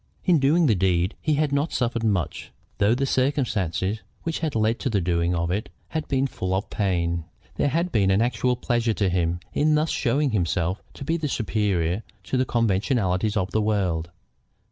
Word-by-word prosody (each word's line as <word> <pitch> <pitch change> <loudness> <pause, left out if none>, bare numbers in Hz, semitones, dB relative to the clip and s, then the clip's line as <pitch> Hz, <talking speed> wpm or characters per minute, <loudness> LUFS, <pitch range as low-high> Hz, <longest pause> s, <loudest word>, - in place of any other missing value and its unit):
In 175 -4 +4
doing 155 +5 +4
the 120 - +4
deed 90 -2 +1
he 155 -1 +1
had 150 -1 +1
not 140 +3 0
suffered 120 -1 -1
much, 100 -7 -1 0.3
though 105 +4 +4
the 135 +2 0
circumstances 110 - 0 0.2
which 165 -1 -2
had 160 -5 -2
led 110 +1 +1
to 135 - -1
the 105 -4 +1
doing 85 0 +1
of 85 +1 -1
it 100 +4 -2 0.2
had 160 - -3
been 135 -1 +1
full 95 -8 -2
of 95 - -3
pain. 85 -4 0 0.3
There - - +2
had 170 +5 0
been 100 -3 +3
an 95 +1 +3
actual 120 +1 +1
pleasure 120 -2 0
to 100 -3 +1
him 85 -1 0
in 155 +1 +3
thus 155 +1 +1
showing 140 +2 +1
himself 90 -1 0
to - - -7
be 165 +4 -1
superior 105 - 0 0.2
to - - -3
the 130 0 +2
conventionalities 110 -2 +1
of 95 -1 -1
the 110 - +1
world. 95 -6 0
110 Hz, 190 wpm, -24 LUFS, 95-135 Hz, 0.3 s, In